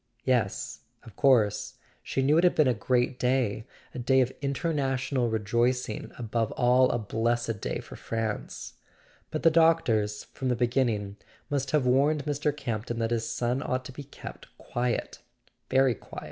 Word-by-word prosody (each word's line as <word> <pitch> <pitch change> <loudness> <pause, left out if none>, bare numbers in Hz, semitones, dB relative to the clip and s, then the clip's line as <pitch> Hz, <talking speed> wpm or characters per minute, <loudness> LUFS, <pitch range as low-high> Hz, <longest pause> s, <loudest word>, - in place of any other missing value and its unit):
Yes, 125 -5 0 0.2
of 110 - -14
course—she 130 +1 +1
knew 150 +4 +4
it - - +2
had 180 - +4
been 155 - +4
a 125 - +3
great 125 +3 0
day, 125 -4 0 0.3
a - - -5
day 130 +2 +3
of 130 +1 0
international 135 -4 0
rejoicing, 120 +2 0
above 115 -1 -1
all 125 +1 +4
a - - +1
blessed 115 0 -1
day - - -3
for - - -11
France. 110 -2 -4 0.6
But 155 - -4
the 165 - +6
doctors, 120 -11 +3
from 130 - -2
the 125 - +2
beginning, 115 -5 0 0.3
must 140 -2 0
have 145 -2 +2
warned 140 +3 +3
Mr. 150 0 0
Campton 120 -3 -3
that 115 0 -1
his 115 -1 -1
son 120 +3 -1
ought 130 -2 -2
to - - -7
be 145 - -8
kept 140 - -10
quiet—very 125 +1 -2
quiet. - - -10
125 Hz, 155 wpm, -28 LUFS, 115-135 Hz, 0.6 s, the